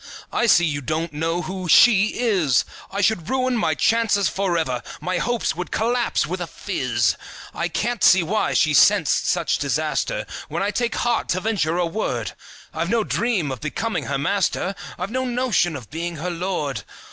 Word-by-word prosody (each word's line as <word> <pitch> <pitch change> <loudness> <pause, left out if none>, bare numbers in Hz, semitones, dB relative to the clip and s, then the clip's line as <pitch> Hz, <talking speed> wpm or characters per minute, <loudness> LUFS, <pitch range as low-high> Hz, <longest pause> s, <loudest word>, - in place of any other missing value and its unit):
I 240 - +2
see 175 -5 +5
you 145 -3 -2
don't 155 +3 -3
know 165 +3 -1
who 185 -1 -5
"she" 215 +2 +6
is. 190 - +2 0.2
I 200 - -2
should 190 -4 +1
ruin 255 -1 +1
my 160 -9 +1
chances 215 +2 +2
forever; 165 -10 -1 0.2
My 185 0 -2
hopes 240 -7 -1
would 180 +1 -5
collapse 240 +2 0
with - - -4
a - - -3
fizz. - - -1 0.4
I - - -1
can't 240 -1 -2
see 185 -1 +6
why 205 +7 0
she - - +3
scents - - +5
such - - +1
disaster - - -1 0.2
When - - -2
I 205 - 0
take 235 +2 -1
heart 240 -1 0
to 185 - +1
venture 185 -6 0
a 180 - +1
word; 125 - -2 0.4
I've 165 +2 -2
no 230 +1 +2
dream 205 - 0
of 130 - -6
becoming 160 +1 -2
her 140 - -1
master, 190 +4 0 0.2
I've 185 +4 -4
no 260 +2 -1
notion 245 -9 +1
of 125 -6 -9
being 170 +2 -4
her 170 +4 -4
lord. 165 - -3
185 Hz, 180 wpm, -22 LUFS, 160-225 Hz, 0.4 s, she